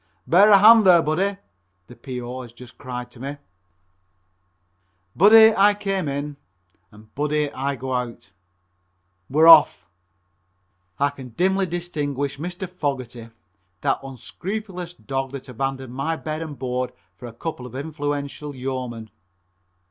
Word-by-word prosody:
"Bear 195 +5 +5
a 200 - +8
hand 220 +3 +8
there, 180 -3 +7
buddy," 190 +7 0 0.5
the 120 - -14
P.O. 125 0 -7
has 120 -2 -11
just 125 +1 -15
cried 125 0 -7
at 120 - -13
me. 140 +2 -5 1.8
"Buddy" 220 +4 +7
I 205 +1 +5
came 195 -5 -2
in 140 +1 -4 0.5
and 110 +1 -18
"buddy" 150 0 -1
I 140 +2 -2
go 130 0 -5
out. 120 -5 -5 1.0
We're 155 +4 +4
off! 155 - +7 1.1
I 140 +3 +1
can 135 -3 -11
dimly 190 +1 +1
distinguish 145 -5 -3
Mr. 180 +4 -5
Fogerty, 130 -9 -5 0.5
that - - 0
unscrupulous 180 - -7
dog 135 -3 -4
that 140 - -8
abandoned 130 0 -4
my 140 +5 -2
bed 155 0 -5
and 155 -3 -7
board 125 -1 -3 0.2
for 120 - -10
a - - -9
couple 125 -1 -6
of 125 - -12
influential 145 0 -4
yeomen. 125 -4 -5
140 Hz, 135 wpm, -22 LUFS, 125-175 Hz, 1.8 s, a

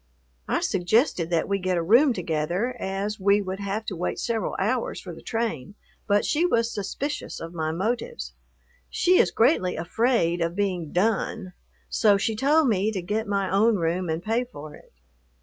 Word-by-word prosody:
I - - 0
suggested 185 - +1
that 170 -2 +1
we 200 0 0
get 185 -1 0
a 170 - 0
room 240 - +5
together, 180 +5 -1
as 195 +2 -3
we 200 +2 +4
would 190 -1 -4
have 200 +2 -3
to 195 - -4
wait 175 +1 -2
several 230 -2 -2
hours - - -1
for - - -8
the - - -12
train, 215 - -3 0.3
but 205 -1 +2
she 315 +3 +1
was 235 -9 +1
suspicious 275 +8 -4
of 165 +1 -7
my 160 -2 -2
motives. 235 - -3 0.6
She 365 0 +3
is - - +4
greatly 225 - +2
afraid 175 0 +1
of 165 +1 -1
being 185 -6 -2
"done," 195 0 -1 0.3
so 205 -3 +3
she 220 +2 -1
told 290 +6 +3
me 210 -1 +1
to 195 -4 -3
get 210 +4 -2
my 200 -1 0
own 215 +4 +4
room 175 0 -1
and 160 +2 -2
pay 225 +3 0
for 155 -12 -10
it. - - -16
200 Hz, 180 wpm, -25 LUFS, 175-230 Hz, 0.6 s, room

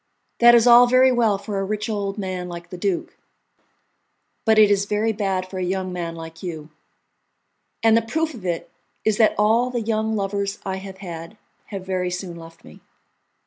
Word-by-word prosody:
That 240 0 +8
is 235 -1 +5
all 245 0 +8
very 255 +1 +5
well 230 -5 +2
for 200 0 -4
a - - -1
rich 210 +2 -3
old 200 -2 -3
man 185 -3 -4
like 170 0 -9
the - - -6
duke, 190 -2 -2 1.3
but 220 -1 +4
it 210 -1 +6
is 200 0 +2
very 210 +2 0
bad 195 -3 -2
for 185 0 -6
a - - -1
young 185 0 -2
man 170 -2 -4
like 165 0 -10
you, 160 -4 -7 1.1
and 225 -1 +5
the 230 - +4
proof 315 +8 -2
of 230 -7 -11
it 175 -2 -3 0.3
is 220 -1 +2
that 220 -2 +4
all 225 +4 +3
the 245 -2 -2
young 220 0 -1
lovers 200 0 -2
I 190 -1 -2
have 190 0 -9
had 165 +4 -8 0.3
have 195 -3 -7
very 185 -1 -1
soon 180 -1 -5
left 165 0 -13
me." 75 - -15
200 Hz, 190 wpm, -22 LUFS, 180-220 Hz, 1.3 s, That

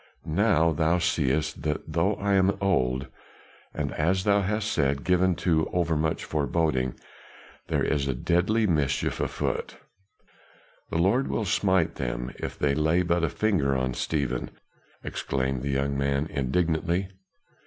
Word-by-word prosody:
Now 85 -1 +3
thou 80 +2 +2
seest 75 -4 0
that 75 0 -1
though 90 +6 +2
I 100 0 0
am 95 0 +3
old 65 -9 +1 0.7
and - - -3
as 95 +5 +1
thou 100 0 +3
hast 105 +2 -1
said, 70 -2 0
given 90 0 +2
to 80 -3 +2
over 85 -2 +1
much 80 +1 -1
foreboding 70 -3 0 0.7
there - - 0
is 70 -2 0
a 65 - -1
deadly 90 - +1
mischief 75 -8 0
on - - +1
foot." - - -3 1.1
"The - - -2
Lord 100 +11 +2
will 110 - -1
smite 95 -4 +1
them - - -3
if - - -5
they 70 -1 +1
lay 80 +4 +2
but 85 -1 +1
a 85 - +2
finger 75 -12 +1
on 65 -1 -1
Stephen," 65 -3 -2 0.5
exclaimed 65 -1 -2
the 70 - -3
young 70 +1 0
man 70 +1 0
indignantly. 85 +6 0
80 Hz, 145 wpm, -26 LUFS, 70-95 Hz, 1.1 s, Now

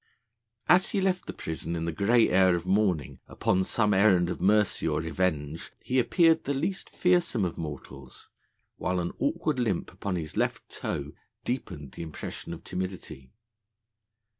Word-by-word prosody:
As 180 +1 +5
he 200 - 0
left 185 -1 0
the - - -3
prison 80 +1 -5
in 80 0 -2
the 85 - -1
grey 110 +7 +3
air 95 -1 +4
of 85 0 -4
morning 90 -8 +1
upon 95 - +1
some 105 +2 +1
errand 95 -3 +4
of - - -5
mercy 105 +2 +3
or - - +1
revenge, 80 -2 -2
he 130 +1 +1
appeared 165 +6 +4
the 140 - -1
least 180 +8 -2
fearsome 175 - +2
of 85 - -3
mortals, 70 -4 -8 0.5
while 90 +1 -1
an 85 0 -3
awkward 160 - 0
limp 105 -8 -1
upon 95 +1 -3
his 80 -3 -4
left - - -1
toe 70 +1 -4 0.3
deepened 90 - -4
the - - -8
impression 80 0 -7
of 85 - -8
timidity. 90 -8 -6
95 Hz, 160 wpm, -28 LUFS, 80-120 Hz, 0.5 s, As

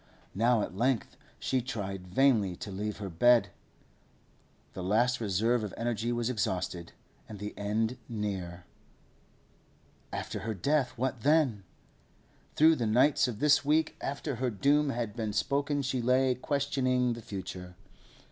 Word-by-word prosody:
Now 115 +1 +2
at 90 - -6
length 120 +3 0 0.2
she 130 -1 0
tried 95 -6 -5
vainly 105 -3 +3
to 100 - -7
leave 105 +2 -4
her 100 - -5
bed. 115 +8 +4 1.2
The 95 - -6
last 120 +6 +1
reserve 110 +3 +1
of 105 - -5
energy 115 0 -1
was 120 -1 -1
exhausted, 90 -7 -2 0.4
and 105 - -7
the 105 +1 -6
end 110 +4 -1
near. 95 -6 -4 1.5
After - - -4
her 110 0 -4
death, 130 - 0
what 130 -1 -2
then? 140 -9 +2 0.9
Through 160 +1 +5
the 115 - -1
nights 130 +6 +4
of 120 -4 -4
this 150 +4 +4
week 155 +2 +1
after 140 -1 -3
her 125 +1 0
doom 140 +7 +2
had 115 -4 -3
been 110 -3 -3
spoken 140 +6 0
she 130 -1 -1
lay 130 +2 +3
questioning 130 -2 0
the 115 - -8
future. 90 -3 -7
120 Hz, 140 wpm, -30 LUFS, 105-130 Hz, 1.5 s, Through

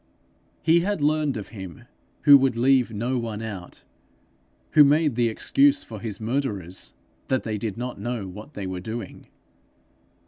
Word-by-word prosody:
He 165 +2 +5
had 200 +1 -1
learned 150 -2 +1
of 105 - -7
him 95 -7 -9 0.4
who 145 - +9
would 135 -3 +4
leave 125 0 +3
no 120 +4 -1
one 115 -2 -4
out; 100 -6 -8 0.9
who 150 - +8
made 150 0 +3
the 120 0 +2
excuse 280 - +2
for 110 -2 -9
his 105 -1 -6
murderers 110 -7 -3 0.3
that 130 -1 0
they 110 -2 -3
did 110 -2 -4
not 125 -2 -5
know 120 -2 -3
what 105 +10 -11
they 100 - -5
were 95 -1 -4
doing. 110 +2 -7
115 Hz, 160 wpm, -24 LUFS, 105-140 Hz, 0.9 s, who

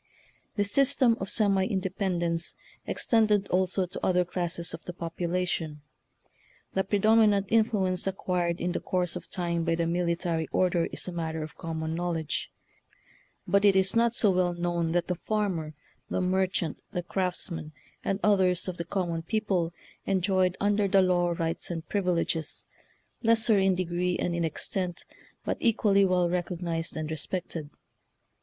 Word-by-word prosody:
This 205 -1 +1
system 270 -2 +4
of 190 - -4
semi 200 -3 +3
independence 180 -3 0 0.3
ex - - -1
tended 210 -3 +3
also 185 +1 +1
to 180 - -8
other 180 -1 +3
classes 175 -1 -3
of - - -7
the 180 - -5
popula 175 +1 -2
tion. 155 -4 -3 0.9
The 190 - +1
predominant 210 0 +4
influence 205 -5 +2
acquired 180 -2 -1
in 175 - -1
the - - -2
course 180 -1 -1
of 180 - -7
time 170 -2 -1
by 165 0 +1
the 170 0 0
military 170 -1 0
order 180 -2 +2
is - - -5
a - - -3
matter 160 -2 -3
of 155 - -9
common 160 -1 -4
knowledge. 165 -2 -2 1.0
But 200 0 +3
it 200 -2 +6
is 190 +2 +2
not 235 0 +3
so 215 -5 +4
well 180 -1 +1
known 175 -1 -1
that 175 -1 +1
the 180 - 0
farmer, 180 -5 -2 0.3
the - - -1
merchant, 185 -3 0
the 175 - -3
craftsman, 175 -3 -2 0.3
and 195 0 -1
others 190 -4 +3
of 180 -1 -4
the 170 - -4
common 170 -2 -2
people 190 -3 0 0.4
enjoyed 185 -1 +2
un 205 0 +2
der 205 -1 +2
the 195 -1 +4
law 175 -1 +2
rights 165 0 -2
and 165 -2 -5
privileges, 170 -5 -1 0.6
lesser 225 -2 +4
in 190 -1 +3
degree 180 0 -1
and 175 - -1
in 170 -1 0
extent, 175 +3 -3 0.4
but - - -1
equally 205 -3 +3
well 180 -1 +2
recognized 170 -2 -2
and 155 0 -3
respected. 160 -1 -3
180 Hz, 155 wpm, -28 LUFS, 170-195 Hz, 1.0 s, it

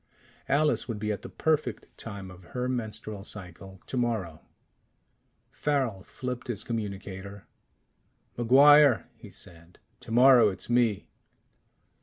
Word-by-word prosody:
Alice 150 +2 +2
would 115 -3 -4
be 105 +1 -2
at 100 -2 -4
the - - -9
perfect 155 -7 -1
time 100 -4 -8
of 90 0 -14
her 125 0 -1
menstrual 110 -4 -4
cycle 95 -1 -10
tomorrow.... 110 -11 -2 1.1
Farrel 130 -9 -1
flipped 125 +2 -6
his 110 -4 -3
communicator. 100 -3 -6 0.9
"MacGuire," 140 +2 +6
he - - -13
said. 85 +1 -14 0.2
"Tomorrow 120 0 +5
it's 95 +4 -6
me." 120 -4 +1
110 Hz, 110 wpm, -28 LUFS, 100-125 Hz, 1.1 s, MacGuire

